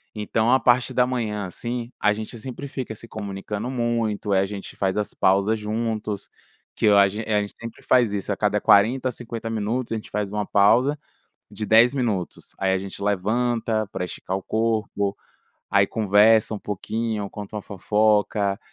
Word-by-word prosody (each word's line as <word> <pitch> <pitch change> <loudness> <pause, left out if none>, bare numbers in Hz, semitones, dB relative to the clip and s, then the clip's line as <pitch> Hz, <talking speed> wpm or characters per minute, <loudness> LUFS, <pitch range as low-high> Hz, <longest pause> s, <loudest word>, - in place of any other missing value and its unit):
Então 110 +2 0
a 130 - +5
parte 120 0 +3
da 125 - +3
manhã, 110 -5 -2
assim, 120 +6 -5
a 105 - +4
gente 110 +3 -6
sempre 130 +4 -7
fica 130 -4 -5
se 115 - -12
comunicando 105 +2 -5
muito. 115 -4 -1
Aí 95 - +4
a 95 - +1
gente 100 0 -8
faz 95 0 -1
as 105 - -2
pausas 100 +3 +2
juntos, 110 -1 -3 0.5
que - - -1
eu 100 -1 +6
a 100 -1 +7
gen 105 +3 -5
a 105 -2 +2
gente 100 - -6
sempre 115 0 -9
faz 120 -5 +3
isso. 100 -2 -3
A - - -1
cada - - +1
40 125 +6 +4
a - - -3
50 115 -1 -6
minutos 115 +3 -2
a 115 - 0
gente 110 - -7
faz 105 -1 -2
uma 105 0 -2
pausa 120 +8 +4 0.5
de 110 - -4
10 115 +4 +6
minutos. 110 -10 -3
Aí 95 -1 +2
a - - +2
gente 95 +1 -7
levanta 110 +2 0
pra 90 - -3
esticar 95 +1 -4
o 95 - -8
corpo, 110 -2 -1 0.5
aí 100 0 +4
conversa 110 +1 +4
um 105 - -4
pouquinho, 105 +1 -3
conta 105 +1 -7
uma 105 - -4
fofoca. 105 0 +1
110 Hz, 185 wpm, -23 LUFS, 100-115 Hz, 0.5 s, a